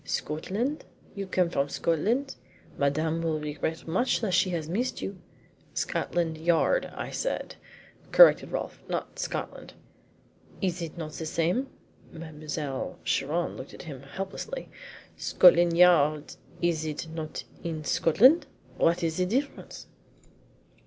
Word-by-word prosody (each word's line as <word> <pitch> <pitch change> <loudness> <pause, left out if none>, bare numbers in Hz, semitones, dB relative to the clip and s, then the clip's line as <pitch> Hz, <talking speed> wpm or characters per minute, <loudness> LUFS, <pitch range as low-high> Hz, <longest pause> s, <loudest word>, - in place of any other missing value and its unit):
"Scotland? 195 - -2 0.3
You 200 -1 -5
come 180 -2 +1
from 140 -3 0
Scotland? 220 - 0 0.4
Madame 155 +4 0
will 160 -2 0
regret 150 +2 -4
much 240 +12 +1
that 205 -5 -1
she 185 - +3
has 165 -4 -3
missed 230 +10 -1
you." 195 -1 -5 0.6
"Scotland 165 -2 -1
Yard, 170 - +2
I - - -5
said," - - -3 0.6
corrected - - +7
Rolfe, - - -4
"not - - -4
Scotland." - - -5 0.9
"Is 180 -3 -1
it 165 0 -6
not 155 -2 -5
the 160 +1 -5
same?" 175 - 0 0.4
Mademoiselle 150 -3 -5
Chiron 155 +5 0
looked - - -9
at - - -10
him 140 -6 -8
helplessly. 195 - -6 0.5
"Scotland 175 -1 +5
Yard 155 -4 +5 0.3
is 165 -2 +1
it 155 +1 -4
not 160 -1 -5 0.2
in 160 -2 -4
Scotland? 255 - +5 0.3
What 170 +2 +2
is 160 -1 -1
the 180 0 +1
difference?" 270 +8 -3
170 Hz, 125 wpm, -28 LUFS, 155-190 Hz, 0.9 s, corrected